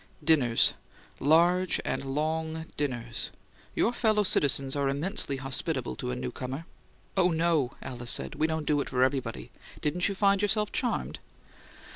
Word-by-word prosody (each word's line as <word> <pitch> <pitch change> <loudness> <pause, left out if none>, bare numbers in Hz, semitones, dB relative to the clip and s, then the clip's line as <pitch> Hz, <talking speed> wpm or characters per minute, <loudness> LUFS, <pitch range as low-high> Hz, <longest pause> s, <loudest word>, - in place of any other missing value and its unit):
"Dinners. 140 -7 +4 0.5
Large 170 +5 +3
and - - -2
long 160 +3 -2
dinners. 120 -5 -3 0.5
Your 235 - +2
fellow 215 -3 +2
citizens 140 -6 +1
are 140 -1 +1
immensely 145 0 -1
hospitable 135 - -3
to - - -4
a 60 - -2
newcomer." 125 - -5 0.5
"Oh, 185 -2 +4
no," 160 -6 +1
Alice 120 -2 -4
said. 65 -1 +5
"We 155 - +1
don't 160 -1 -2
do 145 -1 +2
it - - -5
for 125 -1 +2
everybody. 130 - -2 0.3
Didn't 175 +6 0
you 200 - -3
find 200 0 +3
yourself 210 0 +2
charmed?" 245 -5 -2
150 Hz, 145 wpm, -28 LUFS, 130-175 Hz, 0.5 s, said